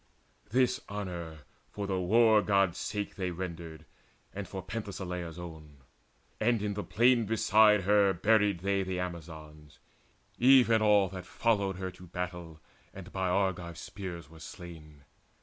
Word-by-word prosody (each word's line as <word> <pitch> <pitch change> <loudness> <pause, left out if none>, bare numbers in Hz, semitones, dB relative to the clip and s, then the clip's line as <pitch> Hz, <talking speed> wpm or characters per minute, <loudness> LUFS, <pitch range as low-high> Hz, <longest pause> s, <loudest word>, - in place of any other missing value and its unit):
This 125 +3 +2
honour 85 -6 -6 0.3
for 100 - -5
the 95 -1 -1
War 110 +3 +5
god's 100 -4 +1
sake 105 0 -4
They 95 -2 -2
rendered, 85 -3 -7 0.5
and 95 -1 -6
for 95 +1 -7
Penthesileia's 95 -5 -5
own. 80 -4 -10 0.6
And 115 -1 +1
in 105 -1 -1
the 105 0 -4
plain 120 -1 +3
beside 105 -1 +4
her 100 0 +4
buried 105 0 +2
they 100 0 +1
The 95 -1 -3
Amazons, 80 -4 -8 0.6
even 125 -3 +6
all 105 -2 +4
that 90 0 -8
followed 100 -2 0
her 95 0 -5
To 90 0 -14
battle, 90 -2 -6 0.4
and 95 0 -10
by 95 -1 -1
Argive 90 -3 -1
spears 90 -5 -7
were 80 +1 -15
slain. 80 -3 -11
95 Hz, 140 wpm, -30 LUFS, 85-105 Hz, 0.6 s, even